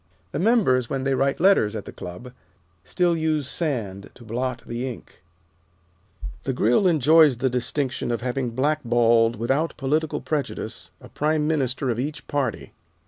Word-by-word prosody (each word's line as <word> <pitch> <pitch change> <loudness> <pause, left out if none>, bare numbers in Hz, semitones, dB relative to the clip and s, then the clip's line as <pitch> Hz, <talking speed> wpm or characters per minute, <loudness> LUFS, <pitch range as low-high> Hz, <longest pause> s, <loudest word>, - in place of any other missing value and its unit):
The - - -3
members, 180 - +3
when 135 -1 -2
they 135 0 +1
write 135 +1 +1
letters 165 - +4
at 105 - -5
the - - -8
Club, 90 +9 -9 0.5
still 175 -1 +1
use 155 -3 0
sand 115 - -3
to 120 - -14
blot 120 +2 -3
the 120 +3 -3
ink. 120 - -13 1.2
The 135 - -1
Grill 125 - +3
enjoys 155 -3 +5
the 130 +1 0
distinction 125 +2 -2
of 120 -3 -1
having 125 0 -2
blackballed, 120 -3 +2
without 135 +9 -1
political 155 +3 0
prejudice, 150 -3 -4
a - - -13
Prime 150 0 0
Minister 135 -4 0
of 115 - -3
each 140 0 -4
party. 135 -6 -3
130 Hz, 150 wpm, -24 LUFS, 120-155 Hz, 1.2 s, enjoys